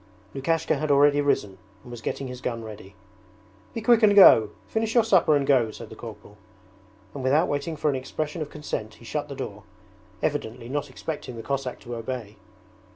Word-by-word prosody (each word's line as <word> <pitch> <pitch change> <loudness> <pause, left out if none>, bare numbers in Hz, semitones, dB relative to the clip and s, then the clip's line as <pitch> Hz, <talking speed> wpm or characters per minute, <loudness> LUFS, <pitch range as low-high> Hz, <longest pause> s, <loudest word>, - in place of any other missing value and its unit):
Lukashka 155 +3 0
had 155 +1 -2
already 145 +1 +5
risen 105 -9 0 0.2
and 120 - -12
was 120 -1 -8
getting 135 +4 -3
his 125 0 -8
gun 115 -2 -3
ready. 105 -3 -10 0.8
'Be 230 - -3
quick 235 +1 +5
and 205 -2 +5
go! 115 - +8 0.2
Finish 220 +1 -1
your 235 - +6
supper 185 -8 +4
and 140 -1 +1
go!' 130 -5 +3
said 110 +1 -10
the - - -8
corporal; 105 -2 -11 0.8
and 140 - -6
without 145 +6 +3
waiting 145 +3 -2
for 150 - -2
an - - -2
expression 150 +5 -4
of 150 - -4
consent 110 -8 -5
he 115 - -16
shut 150 +4 -3
the 140 - -6
door, 105 -5 -6 0.6
evidently 125 -5 -2
not 145 +1 -2
expecting 130 -2 -6
the 115 - -7
Cossack 135 -1 -3
to 120 - -7
obey. 115 -3 -5
135 Hz, 190 wpm, -25 LUFS, 115-150 Hz, 0.8 s, go